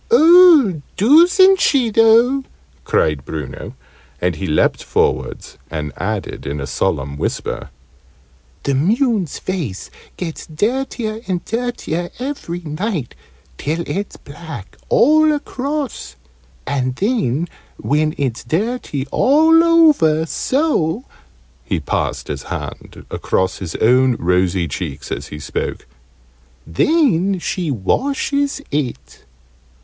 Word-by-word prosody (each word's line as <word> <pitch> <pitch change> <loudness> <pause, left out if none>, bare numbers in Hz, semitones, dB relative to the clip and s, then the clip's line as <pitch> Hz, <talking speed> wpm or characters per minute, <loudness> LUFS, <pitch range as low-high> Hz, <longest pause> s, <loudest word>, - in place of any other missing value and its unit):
"Oh, 330 - +6 0.2
doosn't 355 - +6
she 250 -5 +3
though!" 230 +5 +4 0.4
cried 75 -3 +1
Bruno; 75 -2 -7 0.4
and 90 -1 0
he 95 - -4
leant 75 - +1
forwards - - -1
and 75 -3 -4
added 105 +1 -4
in 70 +1 -3
a 70 - -4
solemn 70 +1 -2
whisper, - - -3 0.9
"The 140 - 0
moon's 205 - +1
face 155 - -4 0.3
gets 165 -3 -6
dirtier 220 +5 -2
and 180 -2 -2
dirtier 225 -8 -3
every 250 -10 -5
night, 160 - -3 0.5
till 160 +4 -2
it's 200 +1 -4
black 145 - -10
all 310 +3 +5
across. 285 -2 -4 0.5
And 130 -2 -1
then, 180 - 0 0.3
when 155 +1 0
it's 130 -5 -2
dirty 165 - -2
all 320 +4 +5
over 300 - +4
so 255 - 0 0.3
" - - -33
(he - - -2
passed - - -2
his - - -4
hand - - -7
across 95 0 -1
his 90 -4 -6
own 125 +2 +3
rosy 90 -1 +1
cheeks 70 -2 -6
as - - -4
he 75 - -8
spoke) 75 - -4 0.8
"then 195 - +2
she 175 -1 -3
washes 280 - -1
it." 125 - -4
175 Hz, 110 wpm, -18 LUFS, -, 0.9 s, Oh